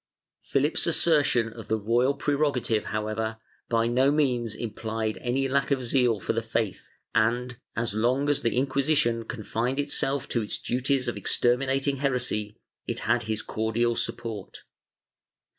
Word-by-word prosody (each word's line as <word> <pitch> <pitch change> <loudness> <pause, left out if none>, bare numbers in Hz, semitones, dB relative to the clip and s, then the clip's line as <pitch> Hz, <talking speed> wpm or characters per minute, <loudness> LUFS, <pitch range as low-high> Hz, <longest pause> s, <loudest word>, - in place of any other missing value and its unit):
Philip's 145 +5 +1
assertion 145 -9 +3
of 115 -1 -10
the 110 - +1
royal 120 +6 +2
prerogative, 140 -7 0
however, 110 +1 -2 0.3
by 115 -1 +2
no 125 +3 +3
means 125 -7 +1
implied 110 -1 -3
any 130 +2 0
lack 140 +1 +1
of 135 -3 +1
zeal 120 -3 +2
for - - -1
the 115 - 0
faith 115 -3 -2 0.3
and, 120 +2 +1 0.2
as 115 -3 0
long 125 +6 +1
as 145 -1 +2
the 115 - 0
Inquisition 135 -3 +1
confined 120 +4 -2
itself 140 -1 0
to 120 - 0
its 105 - -2
duties 130 +1 0
of 120 - -2
exterminating 135 +3 +1
heresy, 125 -6 -1 0.3
it - - -2
had - - +1
his 110 0 -1
cordial 115 +2 0
support. 110 -5 -4
120 Hz, 140 wpm, -27 LUFS, 110-135 Hz, 0.3 s, assertion